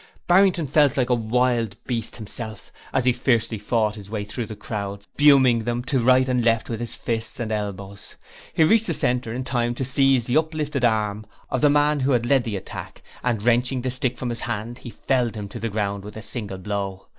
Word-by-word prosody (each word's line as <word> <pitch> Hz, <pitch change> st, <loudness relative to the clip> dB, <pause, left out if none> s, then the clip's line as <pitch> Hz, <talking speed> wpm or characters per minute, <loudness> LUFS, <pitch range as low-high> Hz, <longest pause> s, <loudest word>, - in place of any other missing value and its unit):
Barrington 180 Hz, -2 st, +4 dB
felt 145 Hz, 0 st, +3 dB
like 125 Hz, -1 st, +1 dB
a -, -, +6 dB
wild 115 Hz, -2 st, +1 dB
beast 115 Hz, -3 st, -2 dB
himself, 110 Hz, -1 st, -7 dB, 0.2 s
as 130 Hz, -2 st, 0 dB
he 125 Hz, -, +4 dB
fiercely 120 Hz, -3 st, +1 dB
fought 105 Hz, 0 st, +1 dB
his 100 Hz, -2 st, -10 dB
way 105 Hz, -2 st, -3 dB
through 115 Hz, +2 st, -4 dB
the 110 Hz, -, -7 dB
crowd, 100 Hz, -1 st, -5 dB
spurning 130 Hz, -3 st, +4 dB
them 120 Hz, +1 st, -2 dB
to 135 Hz, 0 st, 0 dB
right 130 Hz, +2 st, +4 dB
and 125 Hz, -2 st, +1 dB
left 115 Hz, 0 st, +1 dB
with 115 Hz, +1 st, -3 dB
fists 115 Hz, +1 st, -3 dB
and 110 Hz, -2 st, -3 dB
elbows. 100 Hz, -2 st, -5 dB, 0.4 s
He 160 Hz, -, +3 dB
reached 225 Hz, +7 st, +4 dB
the 165 Hz, -, 0 dB
centre 125 Hz, -3 st, 0 dB
in 125 Hz, +3 st, -3 dB
time 120 Hz, -2 st, -1 dB
to 130 Hz, -, -2 dB
seize 135 Hz, -2 st, +3 dB
the 125 Hz, -, +2 dB
uplifted 155 Hz, -4 st, -1 dB
arm 105 Hz, -2 st, +1 dB, 0.2 s
of 130 Hz, -, 0 dB
the 145 Hz, -, +5 dB
man 145 Hz, 0 st, +3 dB
who 135 Hz, +1 st, +2 dB
had 120 Hz, -1 st, +1 dB
led 130 Hz, 0 st, +3 dB
the 110 Hz, -3 st, -3 dB
attack -, -, -8 dB, 0.2 s
and 115 Hz, -4 st, 0 dB
wrenching 125 Hz, +2 st, +2 dB
the 130 Hz, -, -1 dB
stick 125 Hz, -1 st, -1 dB
from 125 Hz, -, -3 dB
his 120 Hz, -, -4 dB
hand, 115 Hz, +4 st, -4 dB
he 120 Hz, -, -8 dB
felled 125 Hz, -1 st, -1 dB
him 105 Hz, -2 st, -5 dB
to 120 Hz, -, -7 dB
the 115 Hz, +1 st, -2 dB
ground 100 Hz, -1 st, -2 dB
with 105 Hz, +1 st, -9 dB
a 110 Hz, -, -7 dB
single 105 Hz, -4 st, -4 dB
blow. 100 Hz, -1 st, -4 dB
120 Hz, 215 wpm, -23 LUFS, 110-130 Hz, 0.4 s, a